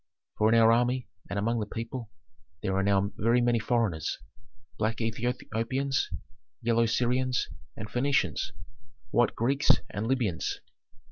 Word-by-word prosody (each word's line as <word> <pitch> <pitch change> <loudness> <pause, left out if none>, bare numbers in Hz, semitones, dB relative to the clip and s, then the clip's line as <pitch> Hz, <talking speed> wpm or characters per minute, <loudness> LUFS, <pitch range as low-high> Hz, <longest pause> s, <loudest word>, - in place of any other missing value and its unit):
For 110 +1 +5
in 115 - +6
our 115 0 +7
army 125 +2 +1 0.2
and - - -3
among 115 +3 +1
the 105 - -2
people 115 +1 -5 0.5
there 95 - 0
are 95 - +2
now 100 0 +2
very 115 +3 +3
many 120 -1 +3
foreigners: 110 - 0 0.6
black 110 0 0
Ethiopians, 120 +3 -1 0.5
yellow 115 0 +2
Syrians 125 +2 +1 0.3
and 105 - -5
Phœnicians, 135 +5 +1 0.6
white 120 - +3
Greeks 135 +5 +1 0.2
and 105 +2 -3
Libyans." 115 -10 0
115 Hz, 130 wpm, -29 LUFS, 110-125 Hz, 0.6 s, our